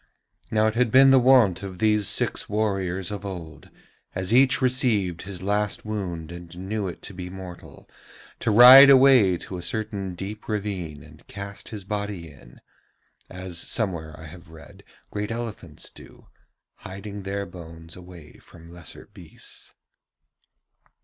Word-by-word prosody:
Now 110 0 +2
it 110 - +1
had 120 0 +1
been 135 +3 +6
the 135 - +6
wont 125 -8 +4
of 95 -2 -7
these 105 -1 +2
six - - 0
warriors 95 -4 -2
of 100 -1 -6
old, 85 -5 -8 0.5
as 95 +4 -1
each 130 +1 +5
received 120 -9 0
his 95 -1 -9
last 105 +2 -1
wound 90 -7 -5
and 85 0 -11
knew 100 +2 -3
it 90 - -8
to - - -8
be 90 -1 -7
mortal, 90 -2 -11 0.5
to - - -1
ride 125 +5 +10
away 130 -9 +6
to 90 - -8
a - - -6
certain 100 -2 -4
deep 100 +4 -8
ravine 95 -8 -4
and - - -18
cast 100 0 -9
his 105 -3 -7
body 100 -5 -5
in, 65 -4 -18 0.7
as 90 -2 -6
somewhere 85 -9 -3
I - - -11
have 85 +2 -13
read 80 0 -15 0.3
great 105 0 -4
elephants 115 -2 -7
do, - - -17 0.5
hiding 100 +2 -8
their 100 +1 -4
bones 80 -3 -12
away 90 -4 -14
from 85 -1 -16
lesser 85 -1 -9
beasts. 90 -6 -8
95 Hz, 150 wpm, -24 LUFS, 90-110 Hz, 0.7 s, ride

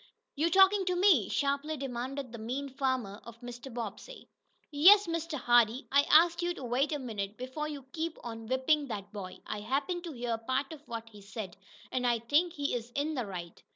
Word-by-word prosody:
"You 315 +4 +2
talkin' 385 +2 +6
to 365 0 +1
me?" 350 - +4
sharply 280 +2 0
demanded 260 0 -4
the 235 - -8
mean 260 +6 -4
farmer 260 -6 -2
of 230 0 -12
Mr. 245 +2 -8
Bobbsey. 235 - -7 0.4
"Yes, 390 +8 +7
Mr. 330 -2 -3
Hardee. 240 +1 +3
I 280 +1 +4
asked 335 +3 +6
you 345 0 -1
to 275 - -8
wait 255 +5 +1
a 295 - 0
minute 215 -6 -5
before 260 +5 -4
you 285 -3 -7
keep 325 0 -3
on 225 -1 -7
whipping 270 +4 +2
that 205 -3 -6
boy. 190 -3 -7
I 210 - -4
happened 275 - -2
to 330 - -6
hear 235 -2 -2
part 260 +5 -2
of 305 - -11
what 230 -1 -6
he 210 -2 -14
said, 200 -2 -7 0.4
and 250 -1 0
I 240 -1 +3
think 295 +9 +1
he 285 -3 -2
is 240 -1 -4
in 295 +3 0
the 250 -7 -2
right." 175 -3 -7
260 Hz, 200 wpm, -31 LUFS, 230-305 Hz, 0.4 s, Yes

